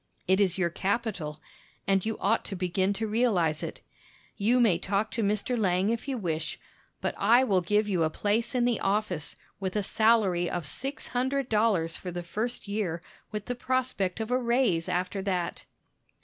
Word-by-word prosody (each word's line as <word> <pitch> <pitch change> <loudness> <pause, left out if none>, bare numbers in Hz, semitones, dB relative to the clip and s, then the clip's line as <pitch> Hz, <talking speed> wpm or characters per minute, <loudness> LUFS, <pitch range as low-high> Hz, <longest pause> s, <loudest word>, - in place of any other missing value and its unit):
It 190 +2 +4
is 190 -3 +2
your 175 -3 +1
capital, 190 -6 -2 0.5
and 195 -1 +2
you 220 0 -2
ought 225 +3 +1
to 200 - -5
begin 185 +1 0
to 220 +2 -2
realize 205 -9 +2
it. - - -6 0.5
You 230 +5 +3
may 205 -9 +4
talk 200 +3 -1
to 230 - -2
Mr. 210 +4 0
Lang 195 -2 +2
if 235 +4 -3
you 270 -2 -1
wish, 165 -6 -3 0.4
but - - -1
I 235 +5 +5
will 195 -7 +2
give 210 +4 +2
you 185 -4 +1
a 160 - +3
place 225 - -1
in 245 -1 +3
the 240 -3 +1
office, 195 -5 -1 0.2
with 190 0 -3
a 210 - +1
salary 200 -5 +3
of 175 -3 -3
six 270 - -3
hundred 260 +1 0
dollars 210 -7 +2
for 185 - -6
the 175 0 -4
first 220 +7 -3
year, 190 -5 -2 0.3
with 210 -1 -4
the 245 - -2
prospect 245 -6 -1
of 220 +2 -3
a 250 - +3
raise 235 -9 +1
after 180 +2 -1
that." 185 -3 -2
205 Hz, 185 wpm, -28 LUFS, 180-230 Hz, 0.5 s, I